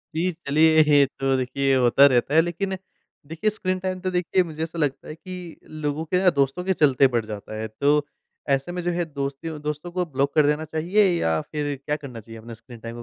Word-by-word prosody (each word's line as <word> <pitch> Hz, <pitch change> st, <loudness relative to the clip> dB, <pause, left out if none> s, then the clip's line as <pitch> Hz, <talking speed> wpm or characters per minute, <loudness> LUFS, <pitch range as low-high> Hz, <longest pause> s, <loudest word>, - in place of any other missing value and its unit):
जी, 180 Hz, +3 st, +1 dB
चलिए 160 Hz, 0 st, +3 dB
ये 145 Hz, -2 st, +5 dB
तो 135 Hz, 0 st, +1 dB
देखिए 135 Hz, +1 st, 0 dB
होता 125 Hz, +3 st, +5 dB
रहता 130 Hz, +2 st, +1 dB
है 160 Hz, -, +7 dB
लेकिन 190 Hz, +3 st, -3 dB, 0.5 s
देखिए, 165 Hz, +7 st, -1 dB
स्क्रीन 185 Hz, -3 st, -2 dB
टाइम 185 Hz, 0 st, -3 dB
तो 185 Hz, -1 st, -2 dB
देखिए 180 Hz, +1 st, +1 dB
मुझे 160 Hz, -1 st, -5 dB
ऐसा 165 Hz, +1 st, -6 dB
लगता 145 Hz, -3 st, -1 dB
है 155 Hz, -, -7 dB
कि 180 Hz, 0 st, -9 dB, 0.3 s
लोगों 150 Hz, +2 st, -2 dB
के 180 Hz, +3 st, +1 dB
ना 180 Hz, -, +7 dB
दोस्तों 140 Hz, +6 st, +1 dB
के 190 Hz, 0 st, +1 dB
चलते 140 Hz, -4 st, +4 dB
बढ़ 115 Hz, -2 st, 0 dB
जाता 105 Hz, 0 st, -7 dB
है। 110 Hz, -, -3 dB
तो 145 Hz, +6 st, +1 dB, 0.4 s
ऐसे 135 Hz, +5 st, 0 dB
में 180 Hz, 0 st, -4 dB
जो 175 Hz, +1 st, -1 dB
है 175 Hz, 0 st, -1 dB
दोस्ती 140 Hz, +1 st, -5 dB
दोस्तों 150 Hz, +4 st, -5 dB
को 180 Hz, 0 st, -1 dB
ब्लॉक 140 Hz, -2 st, -1 dB
कर 150 Hz, -2 st, +5 dB
देना 150 Hz, +1 st, 0 dB
चाहिए 170 Hz, +7 st, +1 dB, 0.2 s
या 80 Hz, -1 st, +1 dB
फिर 145 Hz, -2 st, -2 dB
क्या 150 Hz, -, 0 dB
करना 135 Hz, -6 st, -8 dB
चाहिए 115 Hz, +1 st, -11 dB
अपने 115 Hz, +1 st, -10 dB
स्क्रीन 115 Hz, +1 st, -14 dB
टाइम 115 Hz, +1 st, -8 dB
150 Hz, 220 wpm, -24 LUFS, 135-175 Hz, 0.5 s, है